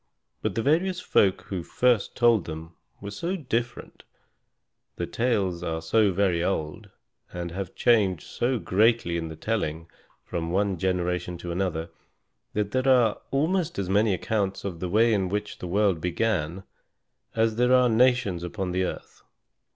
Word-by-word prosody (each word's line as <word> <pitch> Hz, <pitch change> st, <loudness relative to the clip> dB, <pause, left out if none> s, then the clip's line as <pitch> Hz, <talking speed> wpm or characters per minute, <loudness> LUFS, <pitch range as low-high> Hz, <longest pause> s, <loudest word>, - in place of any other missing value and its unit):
But -, -, -2 dB
the 115 Hz, -, 0 dB
various 175 Hz, +6 st, +2 dB
folk 100 Hz, -, +2 dB
who 95 Hz, -3 st, -4 dB
first 120 Hz, +3 st, +1 dB
told 120 Hz, -5 st, +4 dB
them 80 Hz, +1 st, -7 dB, 0.3 s
were 100 Hz, 0 st, -6 dB
so 105 Hz, +11 st, -5 dB
very -, -, -2 dB
different, 120 Hz, -1 st, -3 dB, 0.9 s
the -, -, -3 dB
tales 100 Hz, -8 st, 0 dB
are 80 Hz, -2 st, -2 dB
so 100 Hz, +6 st, +2 dB
very 90 Hz, -3 st, +1 dB
old, 95 Hz, +3 st, -3 dB, 0.4 s
and 85 Hz, -1 st, -5 dB
have 95 Hz, 0 st, -5 dB
changed 100 Hz, -8 st, +2 dB
so 125 Hz, +1 st, -1 dB
greatly 110 Hz, -3 st, +2 dB
in 85 Hz, -1 st, -2 dB
the 80 Hz, -, -7 dB
telling 85 Hz, -6 st, -3 dB, 0.3 s
from 85 Hz, -1 st, -3 dB
one 95 Hz, 0 st, 0 dB
generation 90 Hz, -1 st, -1 dB
to 85 Hz, 0 st, -6 dB
another, 85 Hz, -2 st, -2 dB, 0.6 s
that 105 Hz, -1 st, -1 dB
there 130 Hz, +2 st, 0 dB
are 125 Hz, -5 st, +4 dB
almost 170 Hz, +4 st, 0 dB
as 95 Hz, -2 st, -2 dB
many 105 Hz, +2 st, +3 dB
accounts 100 Hz, -1 st, -2 dB
of 90 Hz, -4 st, -4 dB
the 90 Hz, -, -3 dB
way 115 Hz, +4 st, +4 dB
in 95 Hz, -3 st, 0 dB
which 105 Hz, +2 st, -3 dB
the 90 Hz, -, -5 dB
world 95 Hz, -2 st, +1 dB
began 90 Hz, -1 st, -1 dB, 0.7 s
as 110 Hz, -1 st, +1 dB
there 125 Hz, +1 st, +3 dB
are 125 Hz, -1 st, +5 dB
nations 120 Hz, -6 st, +2 dB
upon 90 Hz, +1 st, -4 dB
the 95 Hz, +1 st, 0 dB
earth. -, -, -6 dB
100 Hz, 160 wpm, -26 LUFS, 90-115 Hz, 0.9 s, are